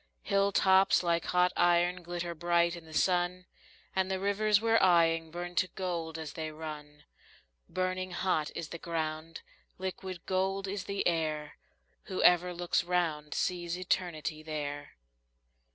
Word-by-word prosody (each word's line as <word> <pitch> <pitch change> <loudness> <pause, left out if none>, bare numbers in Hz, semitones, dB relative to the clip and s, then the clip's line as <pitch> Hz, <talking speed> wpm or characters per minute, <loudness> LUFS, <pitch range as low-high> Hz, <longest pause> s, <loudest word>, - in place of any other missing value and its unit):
Hill 200 0 +2
tops 190 -1 +4
like 170 -1 +1
hot 180 0 +2
iron 175 +1 +3
glitter 175 0 -4
bright 170 +1 +2
in 170 -1 -11
the 160 - -14
sun, 180 +2 +1 0.5
And 190 0 +1
the 190 0 -1
rivers 205 +1 +2
we're 225 0 +3
eying 165 -3 +4
burn 175 +2 -6
to 185 - +3
gold 170 -4 -4
as 160 -2 -6
they 160 -1 -4
run; 150 -2 -8 0.7
Burning 185 0 -2
hot 175 -4 0
is 165 -2 -5
the 170 - -7
ground, 160 -1 -4 0.4
liquid 185 -1 -5
gold 195 +1 0
is 195 0 -4
the 200 0 -2
air; 155 -3 -1 0.5
Whoever 180 -1 +4
looks 175 0 0
round 160 -4 -1
sees 175 -1 -1
Eternity 175 -4 -2
there. 145 -2 -5
175 Hz, 140 wpm, -31 LUFS, 160-185 Hz, 0.7 s, tops